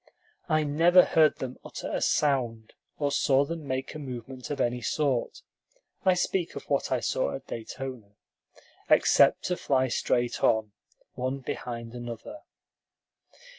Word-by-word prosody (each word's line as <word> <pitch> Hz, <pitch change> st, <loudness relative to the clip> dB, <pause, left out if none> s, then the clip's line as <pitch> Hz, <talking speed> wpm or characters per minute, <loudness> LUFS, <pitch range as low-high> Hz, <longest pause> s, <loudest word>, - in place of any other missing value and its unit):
I 155 Hz, -1 st, +3 dB
never 170 Hz, +5 st, +5 dB
heard 155 Hz, -2 st, +4 dB
them 130 Hz, -1 st, -6 dB
utter -, -, -7 dB
a -, -, -1 dB
sound, 120 Hz, -7 st, 0 dB, 0.2 s
or 145 Hz, -1 st, 0 dB
saw 140 Hz, 0 st, +3 dB
them 160 Hz, -1 st, -6 dB
make 130 Hz, +1 st, -3 dB
a 155 Hz, -, -7 dB
movement 130 Hz, -2 st, -7 dB
of 145 Hz, -, -3 dB
any 120 Hz, 0 st, 0 dB
sort 125 Hz, +2 st, -1 dB, 0.6 s
(I 185 Hz, -1 st, +4 dB
speak 180 Hz, -1 st, -1 dB
of -, -, -6 dB
what -, -, 0 dB
I -, -, +2 dB
saw -, -, 0 dB
at -, -, -9 dB
Daytona) 115 Hz, -2 st, -7 dB, 0.7 s
except -, -, +5 dB
to 180 Hz, -, 0 dB
fly 130 Hz, -1 st, +1 dB
straight 120 Hz, 0 st, 0 dB
on, 110 Hz, -2 st, +2 dB, 0.4 s
one 130 Hz, +2 st, -3 dB
behind 115 Hz, -2 st, -5 dB
another. 120 Hz, -, -7 dB
130 Hz, 140 wpm, -28 LUFS, 120-150 Hz, 0.7 s, never